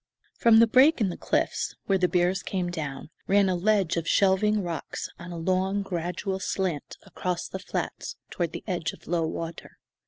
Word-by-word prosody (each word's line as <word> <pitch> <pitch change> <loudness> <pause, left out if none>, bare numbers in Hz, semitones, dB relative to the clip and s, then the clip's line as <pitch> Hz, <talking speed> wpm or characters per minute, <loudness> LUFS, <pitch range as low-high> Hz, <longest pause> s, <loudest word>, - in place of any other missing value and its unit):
From 230 -1 +6
the 230 - +8
break 260 +7 +5
in 210 -4 +2
the 175 - -4
cliffs, - - -1
where 195 -1 +2
the 180 - +3
bears 180 +1 +1
came 180 -2 -2
down, 150 -3 -5 0.2
ran 200 0 +4
a 185 - +1
ledge 195 -2 +2
of 165 0 -2
shelving 200 +2 +3
rocks 170 -3 -4
on 175 +1 -8
a 170 - -5
long, 190 +4 0
gradual 185 +2 -3
slant 185 -6 -2
across 180 -1 -3
the 190 - -6
flats - - -4 0.2
toward 170 -3 -1
the - - -7
edge 175 -6 -2
of - - -15
low 165 -1 0
water. 165 +1 -6
185 Hz, 185 wpm, -27 LUFS, 170-195 Hz, 0.2 s, the